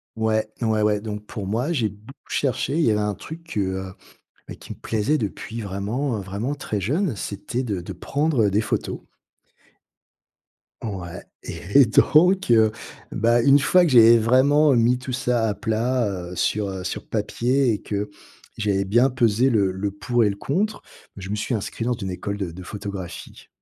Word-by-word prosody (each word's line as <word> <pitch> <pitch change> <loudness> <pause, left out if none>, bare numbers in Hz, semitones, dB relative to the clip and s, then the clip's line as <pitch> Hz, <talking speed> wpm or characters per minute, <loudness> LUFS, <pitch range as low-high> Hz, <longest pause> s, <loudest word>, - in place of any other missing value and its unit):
Ouais, 110 -1 0
ouais, 110 -2 +1
ouais. 105 -1 +2
Donc 105 -1 -6
pour 100 -2 -6
moi, 120 - -1
j'ai 115 -9 +1
beaucoup 105 +8 -16
cherché 135 0 -1
et - - 0
il 165 - +2
y 115 - +4
avait 105 - +1
un 105 0 0
truc, 165 - -10
heu, 95 -1 -2 0.6
bah, - - -7
qui - - -10
me - - -11
plaisait 115 +8 0
depuis 110 +2 -5
vraiment, 110 +6 -2
heu, - - -5
vraiment 105 +9 -3
très 110 -7 -4
jeune, 145 - 0
c'était 105 +6 -4
de 100 -7 -3
de - - -7
prendre 140 -7 0
des 105 +3 +1
photos. - - -3 1.8
Ouais 95 -6 -6 0.2
et - - -7 0.2
et - - +7
donc 180 - +4
heu, 110 -2 +5 0.4
bah, 115 +2 +2
une 140 +3 +6
fois 180 +5 +4
que 170 - +2
j'avais, 115 -2 +8
heu, - - +1
vraiment 135 +5 +4
mis 120 +2 +3
tout 130 0 -6
ça 120 -3 0
à 105 - 0
plat, 115 +2 0
heu, 90 -2 -5
sur 105 +2 0
heu, 95 -1 -5
sur - - -5
papier 125 +1 +1
et 105 - -2
que 105 0 -3 0.5
j'avais 100 -2 0
bien 120 +7 +4
pesé 120 +1 +2
le 100 -5 +2
le 100 +2 -2
pour 120 +4 0
et 105 - +3
le 100 - -3
contre, 200 - -2 0.3
je 95 0 -7
me - - 0
suis 115 +3 -2
inscrit 110 +2 -4
dans 125 - +1
une 95 -5 -5
école 100 +3 -4
de 95 -4 -4
de 90 +2 -10
photographie. 100 -3 -8
110 Hz, 190 wpm, -23 LUFS, 100-130 Hz, 1.8 s, j'avais